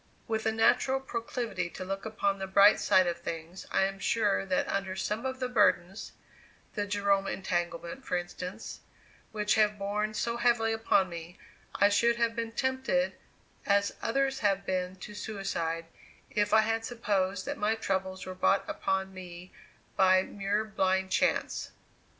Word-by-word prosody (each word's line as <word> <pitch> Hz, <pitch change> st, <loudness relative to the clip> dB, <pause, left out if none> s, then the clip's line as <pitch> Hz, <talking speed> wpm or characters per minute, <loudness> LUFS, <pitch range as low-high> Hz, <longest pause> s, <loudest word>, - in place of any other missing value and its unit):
With 220 Hz, -1 st, -1 dB
a -, -, +3 dB
natural 250 Hz, +4 st, +3 dB
proclivity 230 Hz, -7 st, -3 dB
to 185 Hz, -, -7 dB
look 195 Hz, +3 st, -4 dB
upon 200 Hz, -3 st, -1 dB
the 190 Hz, -, -3 dB
bright 200 Hz, +2 st, +6 dB
side 185 Hz, 0 st, +4 dB
of 170 Hz, -1 st, -2 dB
things, 170 Hz, +2 st, -6 dB
I -, -, +2 dB
am 195 Hz, 0 st, -2 dB
sure 205 Hz, -1 st, +1 dB
that 185 Hz, -, +1 dB
under 190 Hz, -1 st, -2 dB
some 210 Hz, +6 st, -2 dB
of 260 Hz, 0 st, -5 dB
the 255 Hz, -, -1 dB
burdens 195 Hz, -5 st, +1 dB, 0.6 s
the 205 Hz, -1 st, -2 dB
Jerome 200 Hz, -1 st, +1 dB
entanglement, 175 Hz, +4 st, -3 dB
for 180 Hz, -, -1 dB
instance 180 Hz, +4 st, -6 dB, 0.5 s
which 210 Hz, -1 st, +1 dB
have 210 Hz, -1 st, +3 dB
borne 210 Hz, +2 st, -2 dB
so 235 Hz, +2 st, -1 dB
heavily 235 Hz, -2 st, +2 dB
upon 220 Hz, -4 st, +2 dB
me, 170 Hz, 0 st, -8 dB, 0.4 s
I 200 Hz, -, +5 dB
should 235 Hz, +3 st, +3 dB
have 235 Hz, -1 st, 0 dB
been 230 Hz, -1 st, -3 dB
tempted, 260 Hz, +1 st, 0 dB, 0.5 s
as 200 Hz, 0 st, +3 dB
others 270 Hz, +3 st, 0 dB
have 195 Hz, -2 st, +1 dB
been, 185 Hz, -1 st, -2 dB
to 200 Hz, +3 st, -9 dB
suicide, 170 Hz, -6 st, -3 dB, 0.5 s
if 205 Hz, 0 st, +1 dB
I 220 Hz, +1 st, +7 dB
had 225 Hz, +1 st, 0 dB
supposed 200 Hz, -5 st, -1 dB
that -, -, -4 dB
my 215 Hz, +2 st, +2 dB
troubles 190 Hz, -3 st, -2 dB
were 185 Hz, -, -5 dB
brought 190 Hz, +1 st, +2 dB
upon 190 Hz, 0 st, -1 dB
me 180 Hz, -1 st, -10 dB, 0.4 s
by 185 Hz, -1 st, +5 dB
mere 205 Hz, +2 st, -2 dB
blind 190 Hz, -2 st, 0 dB
chance. -, -, 0 dB
200 Hz, 160 wpm, -30 LUFS, 185-225 Hz, 0.6 s, I